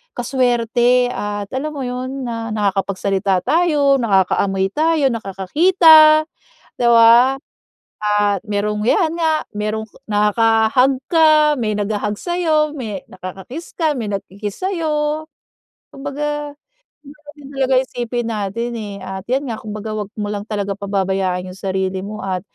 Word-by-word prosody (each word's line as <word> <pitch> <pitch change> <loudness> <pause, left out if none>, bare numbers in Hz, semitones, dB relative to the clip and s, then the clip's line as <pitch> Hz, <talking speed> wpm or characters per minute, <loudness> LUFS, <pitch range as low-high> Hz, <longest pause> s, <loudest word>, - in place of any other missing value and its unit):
ka-swerte 245 0 +1
at, 205 -2 -4
alam 275 +4 -3
mo 275 - -4
yun, 255 +2 -4
na 230 -1 -4
nakakapagsalita 195 -2 0
tayo, 295 -5 +3
nakakaamoy 195 -2 +1
tayo, 310 +1 +2
nakakakita, 310 - +5 0.5
'di - - -2
ba? 235 +3 +6 0.6
At 205 -1 +1
merong, 210 0 -2
'yan 330 +2 +2
nga, 320 -2 +1
merong 215 +1 -3 0.2
nakaka-hug 225 +5 +2
ka, 310 -2 +5
may 215 -2 -1
nagha-hug 205 0 -2
sa'yo, 320 -4 0
may 215 -8 -5
nakaka-kiss 190 - -9
ka, 320 -3 +1
may 225 - -3
nagki-kiss 200 - -6
sa'yo. 310 -4 -1 0.7
Kumbaga, 295 +1 -4 0.6
dapat 295 0 -16 0.2
talaga 270 -1 0
isipin 240 -1 -4
natin 225 +2 -3
eh 210 -3 -6
at 190 0 -6
'yan 265 +4 0
nga 230 - -3
kumbaga 215 0 -6
'wag 210 -2 -4
mo 210 - -2
lang 205 -1 -4
talaga 200 -2 -2
pababayaan 190 -2 -2
'yung 185 - -9
sarili 190 0 -2
mo 210 +2 -7
at 185 -2 -2
230 Hz, 130 wpm, -19 LUFS, 200-285 Hz, 0.7 s, ba